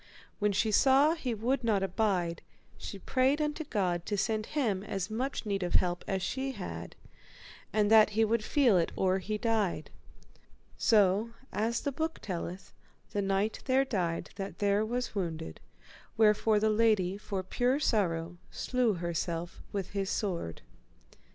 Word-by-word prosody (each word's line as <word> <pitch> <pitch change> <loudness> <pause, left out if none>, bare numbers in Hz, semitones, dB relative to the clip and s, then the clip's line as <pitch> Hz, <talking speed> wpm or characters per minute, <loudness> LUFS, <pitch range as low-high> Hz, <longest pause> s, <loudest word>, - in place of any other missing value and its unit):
When 210 0 +2
she 215 +2 +1
saw 275 +7 +5
he 260 -8 -3
would 245 +4 0
not 210 -4 +2
abide, 185 -4 0 0.3
she 200 - -7
prayed 260 - +1
unto 300 +1 -1
God 180 - -1
to 205 - -1
send 215 +2 -1
him 230 -11 0
as 195 0 -4
much 255 +3 -2
need 200 -2 -1
of 175 -1 0
help 175 -1 +1
as 190 -2 -1
she 265 +7 -2
had, - - -7 0.8
and 210 -1 +2
that 220 -1 +7
he 220 +1 +2
might 225 +1 +1
feel 240 - +3
it 165 - 0
or 190 0 +2
he 215 +3 -3
died. 220 -4 -1 0.8
So, 210 +1 +3 0.2
as 225 +2 0
the 285 - -1
book 320 +4 -2
telleth, 180 0 -6 0.4
the 205 - -1
knight 195 +2 0
there 265 +1 +3
died 180 -9 -2
that 195 0 -5
there 205 +1 +2
was 245 +3 -2
wounded, 165 -5 -4 0.6
wherefore 215 0 +4
the 215 +1 +2
lady 210 -4 +2
for 200 -2 -4
pure 250 +8 +1
sorrow 175 - 0
slew 250 -4 0
herself 170 0 -3
with 195 -3 -4
his 195 -1 -2
sword. 170 - -3
210 Hz, 155 wpm, -30 LUFS, 190-235 Hz, 0.8 s, that